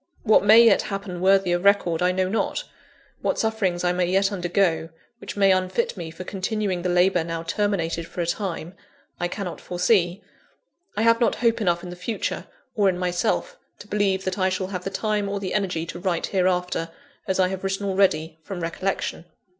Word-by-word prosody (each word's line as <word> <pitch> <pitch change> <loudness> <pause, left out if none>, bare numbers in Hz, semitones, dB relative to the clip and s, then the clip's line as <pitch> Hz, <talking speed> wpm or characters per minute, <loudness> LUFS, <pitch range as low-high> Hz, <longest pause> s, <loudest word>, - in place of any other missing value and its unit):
What 220 -3 +5
may 220 +3 +8
yet 230 - +5
happen 195 -3 -5
worthy 195 -1 +4
of 175 +1 0
record, 200 -5 +3
I 180 0 +3
know 185 0 0
not: 220 +4 -1 0.6
what - - 0
sufferings 200 -6 0
I 175 - +2
may 180 -1 +1
yet 195 +2 +2
undergo, 175 -3 0 0.3
which - - -8
may 195 -1 +5
unfit 185 +4 0
me 170 -4 -6
for 165 +3 -8
continuing 195 -1 -2
the 180 - -1
labour 180 0 +3
now 165 0 -4
terminated 170 -3 -1
for - - -9
a - - 0
time, 170 -1 -3 0.5
I 175 - 0
cannot 185 -1 -5
foresee. 180 0 +1 0.7
I 215 - +2
have 230 +1 +4
not 235 - +3
hope 230 -1 +1
enough 175 -3 +1
in 180 - -7
the - - -7
future, 180 +5 -3 0.3
or 205 -4 +3
in 180 - -1
myself; 180 - -1 0.2
to 205 - -12
believe 200 -2 0
that 185 +1 -2
I 185 0 +3
shall 185 0 -2
have 180 -2 -5
the - - -1
time 210 0 -1
or 200 0 -2
the 190 -2 -4
energy 180 -5 -1
to 170 - -7
write 180 -2 -1
hereafter, 180 -3 0 0.4
as 190 -1 0
I 185 -1 +4
have 190 0 -5
written 195 +1 -2
already, 170 -5 +1
from 190 +2 -6
recollection. 170 +1 -3
185 Hz, 195 wpm, -24 LUFS, 175-200 Hz, 0.7 s, may